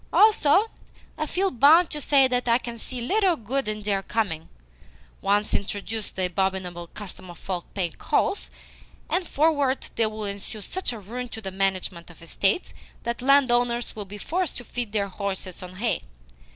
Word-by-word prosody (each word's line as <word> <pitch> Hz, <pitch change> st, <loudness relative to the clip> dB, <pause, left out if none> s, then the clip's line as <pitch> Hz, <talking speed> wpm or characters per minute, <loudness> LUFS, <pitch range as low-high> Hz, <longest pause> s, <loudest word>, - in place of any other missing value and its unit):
"Also, 410 Hz, -3 st, +5 dB, 0.5 s
I 310 Hz, 0 st, -2 dB
feel 380 Hz, +5 st, +1 dB
bound 310 Hz, +7 st, +6 dB
to 300 Hz, -, -3 dB
say 275 Hz, -2 st, +5 dB
that 250 Hz, -1 st, 0 dB
I 235 Hz, 0 st, +5 dB
can 235 Hz, -2 st, -7 dB
see 250 Hz, +2 st, -5 dB
little 380 Hz, -, +3 dB
good 265 Hz, +1 st, -2 dB
in 215 Hz, 0 st, -2 dB
their 200 Hz, -1 st, +1 dB
coming. 195 Hz, -7 st, -2 dB, 0.7 s
Once 205 Hz, +2 st, +1 dB
introduce 205 Hz, +2 st, -2 dB
the 185 Hz, -, -1 dB
abominable 180 Hz, -1 st, -1 dB
custom 185 Hz, -1 st, -9 dB
of 175 Hz, -, -10 dB
folk 180 Hz, -1 st, -5 dB
paying 180 Hz, -4 st, 0 dB
calls, 60 Hz, -, 0 dB, 0.6 s
and 355 Hz, +1 st, +1 dB
forthwith 285 Hz, -3 st, +1 dB
there 225 Hz, -2 st, +3 dB
will 215 Hz, 0 st, -5 dB
ensue 200 Hz, +2 st, -5 dB
such 375 Hz, -, -3 dB
ruin 235 Hz, +3 st, -6 dB
to 225 Hz, -, -7 dB
the 195 Hz, -3 st, -5 dB
management 190 Hz, -3 st, -1 dB
of 170 Hz, -1 st, -15 dB
estates 195 Hz, -, 0 dB, 0.3 s
that 235 Hz, +1 st, -2 dB
landowners 245 Hz, -3 st, +3 dB
will 210 Hz, -2 st, -5 dB
be 205 Hz, +2 st, -8 dB
forced 350 Hz, -, -2 dB
to 245 Hz, -, -7 dB
feed 240 Hz, -2 st, -4 dB
their 205 Hz, -2 st, +1 dB
horses 190 Hz, -2 st, -4 dB
on 180 Hz, 0 st, -9 dB
hay. 225 Hz, +4 st, 0 dB
220 Hz, 170 wpm, -25 LUFS, 195-270 Hz, 0.7 s, bound